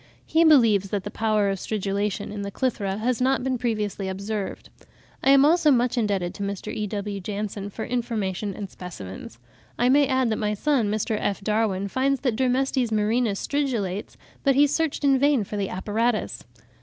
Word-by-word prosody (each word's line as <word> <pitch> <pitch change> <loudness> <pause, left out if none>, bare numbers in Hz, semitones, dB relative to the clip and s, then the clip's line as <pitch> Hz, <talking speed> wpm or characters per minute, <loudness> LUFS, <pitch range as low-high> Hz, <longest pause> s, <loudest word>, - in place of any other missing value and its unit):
He 325 +1 +3
believes 230 - +5
that 200 -2 -2
the 205 - -6
power 215 -3 +1
of 195 - -3
stridulation 205 0 -2
in 205 -1 -5
the 200 - -4
Clythra 200 -4 -2
has 240 +2 -1
not 265 0 +2
been 260 -1 -1
previously 210 -5 -2
observed. 200 +1 -5 0.5
I - - +3
am 275 0 +7
also 325 0 +4
much 250 -2 +3
indebted 200 -6 0
to - - -9
Mr. 200 +1 -4
E.W. 205 -1 -3
Janson, 205 0 -4
for 220 +2 -6
information 215 -5 -2
and 205 - -5
specimens. 115 - -9 0.4
I 245 +1 +3
may 280 +1 +5
add 260 -3 +1
that 220 - 0
my 210 -1 0
son, 255 -2 +1
Mr. 215 +1 -1
F. 200 - -1
Darwin, 210 -2 0
finds 265 +5 0
that 250 -6 0
Dermestes 260 0 +1
murinus 215 0 +1
stridulates, 225 -10 -2 0.3
but 275 -2 +3
he 285 +2 +6
searched 300 +1 -1
in 275 -2 +4
vain 280 -4 +3
for 205 - -7
the 200 -2 -2
apparatus. 215 +4 -1
215 Hz, 180 wpm, -24 LUFS, 200-255 Hz, 0.5 s, am